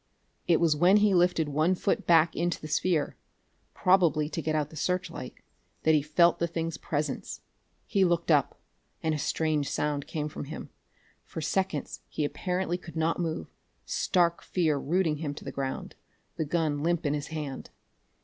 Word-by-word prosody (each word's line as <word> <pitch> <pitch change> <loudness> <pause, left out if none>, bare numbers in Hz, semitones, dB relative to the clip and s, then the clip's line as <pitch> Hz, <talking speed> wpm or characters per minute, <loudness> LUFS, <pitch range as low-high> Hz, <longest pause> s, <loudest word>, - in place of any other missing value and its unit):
It 170 -2 +4
was 165 -3 +3
when 180 +6 +5
he 210 -1 +4
lifted 175 -3 +3
one 155 +5 +2
foot - - -1
back 165 -1 +5
into 175 0 0
the 155 - -7
sphere 155 0 0 0.6
probably 170 -5 +3
to 165 - -3
get 155 0 -1
out 150 -1 -1
the - - -11
searchlight 170 -5 -3 0.5
that 160 - +4
he 150 - +4
felt 165 +4 +3
the 170 - +1
thing's 165 -1 -3
presence. 145 -2 -3 0.4
He 195 - +2
looked 170 -2 +2
up 145 -4 +2 0.4
and 160 -1 +1
a 150 - -2
strange 155 -2 0
sound 145 -1 -1
came 150 -1 -3
from 150 -1 -6
him. 145 - -8 0.5
For - - -7
seconds 175 -1 -2
he 150 - -1
apparently 180 +2 -2
could 170 -2 -11
not 160 +1 0
move, 160 - -3 0.3
stark 170 -1 +1
fear 160 -6 0
rooting 160 +1 +1
him 145 -2 -4
to - - -10
the - - -4
ground, 135 -1 -4 0.4
the 160 - -1
gun 150 -2 0
limp 170 +1 0
in 145 - +2
his 145 -1 -3
hand. 150 -4 -5
160 Hz, 175 wpm, -28 LUFS, 150-175 Hz, 0.6 s, when